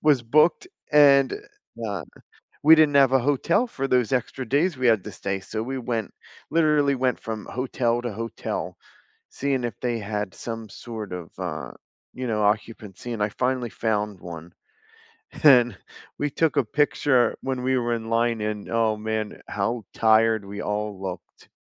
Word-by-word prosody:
was 145 -5 +4
booked 150 - +3 0.2
and, 140 -3 +6 0.5
uh, 100 -5 -3 0.6
we 155 +2 +9
didn't 155 -2 +4
have 135 -2 +6
a 135 - +5
hotel 145 - +1
for 135 - -3
those 125 -1 +2
extra 130 0 -2
days 145 +5 +1
we 130 -1 +1
had 110 -5 +3
to - - -6
stay, 95 0 -3
so 110 +3 -5
we 135 +3 -4
went 115 -3 -3 0.4
literally 150 -3 +3
went 130 -1 0
from 110 -2 -6
hotel 120 -2 -1
to 120 -3 -3
hotel, 115 +2 -5 0.5
seeing 135 -2 -1
if 115 -5 -4
they 120 -2 -1
had 105 -1 -4
some 115 -2 -6
sort 110 -1 -8
of, 90 -2 -6
uh, - - -4 0.4
you 130 0 -4
know, 105 -2 0
occupancy, 105 +1 -2
and 110 -3 -2
I 105 - +1
finally 125 0 -1
found 105 -4 -2
one. 85 0 -9 0.9
And, 125 -5 +6 0.4
we 145 - 0
took 160 +2 +1
a 140 - +4
picture 140 0 +2
when 130 -1 -3
we 130 0 +2
were 120 -1 0
in 115 -1 -4
line, 115 0 +1
and 105 -1 -4
oh 115 -1 +1
man, 110 0 -4
how 115 +3 -2
tired 110 -1 +3
we 100 +1 -6
all 105 -1 -3
looked. 95 -2 -8
115 Hz, 165 wpm, -24 LUFS, 105-130 Hz, 0.9 s, we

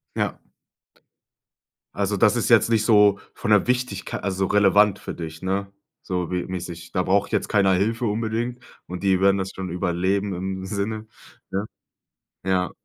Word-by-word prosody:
Ja. - - -1 1.6
Also, - - 0
das - - +4
ist - - 0
jetzt - - +5
nicht 110 -2 +2
so 105 -3 +5
von 110 - -3
der 105 -3 +5
Wichtigk 125 -6 -1
also, 95 0 -1
relevant 105 +1 +4
für - - -6
dich, 80 -1 -7
ne? 95 +1 -2 0.3
So 90 -2 -3
wie 90 -1 -1
mäßig: 85 -2 -6
„Da 90 - 0
braucht 100 +2 +1
jetzt - - 0
keiner 100 -3 +3
Hilfe 115 +6 0
unbedingt 115 +3 -2 0.2
und 90 0 -6
die 95 -2 +3
werden 100 0 +4
das 95 -1 -2
schon 95 -1 -5
überleben“, 95 +3 0
im 95 +1 -4
Sinne, 110 +2 -3 0.4
ja? 100 +2 -1 0.8
Ja. 95 -1 +1
95 Hz, 160 wpm, -23 LUFS, 95-105 Hz, 1.6 s, jetzt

